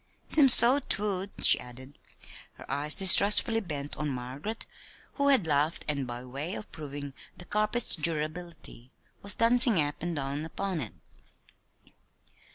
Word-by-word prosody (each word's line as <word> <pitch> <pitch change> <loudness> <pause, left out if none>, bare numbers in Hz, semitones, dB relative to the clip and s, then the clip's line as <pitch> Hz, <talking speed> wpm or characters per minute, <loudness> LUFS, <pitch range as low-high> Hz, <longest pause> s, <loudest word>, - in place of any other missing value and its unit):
"Seems 280 -4 +5
so 245 +4 +8
'twould," 200 -6 -2
she - - +4
added, 130 +3 -14 0.5
her - - -16
eyes 150 +2 -3
distrustfully 205 +4 +3
bent 150 -8 -9
on 150 -1 -5
Margaret 135 - -9 0.5
who 280 -1 -3
had 265 -10 +2
laughed, 150 +1 -3
and 140 -3 -5
by 120 +1 -10
way 140 +9 -8
of 215 - -12
proving 145 -2 -11 0.2
the 175 - -15
carpet's 215 +4 -2
durability, 155 -4 -5 0.3
was 200 - +1
dancing 235 -3 +3
up 145 -1 -4
and 170 0 -6
down 140 +1 -7
upon 180 +1 -7
it. 110 - -9
160 Hz, 140 wpm, -25 LUFS, 140-210 Hz, 0.5 s, so